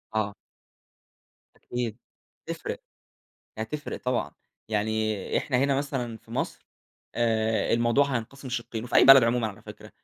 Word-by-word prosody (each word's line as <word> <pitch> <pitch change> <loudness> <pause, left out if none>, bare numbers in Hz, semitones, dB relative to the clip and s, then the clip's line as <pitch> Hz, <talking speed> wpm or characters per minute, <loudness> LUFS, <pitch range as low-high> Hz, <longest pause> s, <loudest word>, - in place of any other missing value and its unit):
آه. 105 -2 0 1.2
أكيد 120 -3 -4 0.5
تفرق، - - -5 0.8
هتفرق 145 +8 -4
طبعًا. 125 -1 0 0.4
يعني 110 -1 0
إحنا 130 - -1
هنا 140 +1 +3
مثلًا 135 -5 -2
في - - -21
مصر - - -3 0.5
آآ، 110 -1 +1
الموضوع 120 +4 +4
هينقسم 130 +4 -7
شِقّين، 120 -2 -4
وفي 125 - -6
أي - - +8
بلد 135 -2 +10
عمومًا 115 0 +2
على 105 -2 -8
فكرة - - -11
120 Hz, 125 wpm, -27 LUFS, 110-130 Hz, 1.2 s, بلد